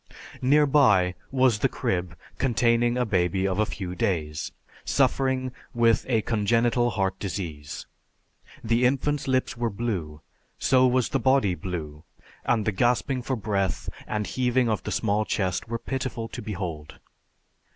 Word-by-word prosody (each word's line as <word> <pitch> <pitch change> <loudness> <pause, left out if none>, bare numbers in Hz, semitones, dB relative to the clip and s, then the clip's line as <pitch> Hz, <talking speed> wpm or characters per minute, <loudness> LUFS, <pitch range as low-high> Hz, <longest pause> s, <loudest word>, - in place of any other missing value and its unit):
Nearby 135 -9 +4 0.2
was 130 -5 +3
the - - +2
crib 90 -2 -2 0.2
containing 120 -1 +2
a 125 - +1
baby 95 -2 +1
of 95 +1 -1
a 110 - +2
few 90 -3 -5
days, 85 -8 -2 0.3
suffering 130 -1 +1 0.2
with 115 -1 +3
a 115 -4 +2
congenital 120 +2 +2
heart 95 -4 -1
disease. 80 -7 -5 0.8
The 115 +2 +2
infant's 140 +3 +1
lips 130 -1 +1
were 120 -1 -1
blue, 95 -9 -4 0.4
so 130 -1 +4
was 125 -1 +2
the 135 - 0
body 130 -6 +3
blue, 80 -5 -6 0.4
and 110 -3 +1
the 110 - +2
gasping 125 +5 +1
for 130 +2 -2
breath 100 -6 -1 0.2
and 105 -1 -2
heaving 125 +1 +1
of 110 - 0
the - - -5
small 105 -1 +1
chest 95 -3 -1
were 115 +1 -2
pitiful 125 -2 -4
to - - -7
behold. 85 -7 -5
110 Hz, 140 wpm, -26 LUFS, 95-125 Hz, 0.8 s, Nearby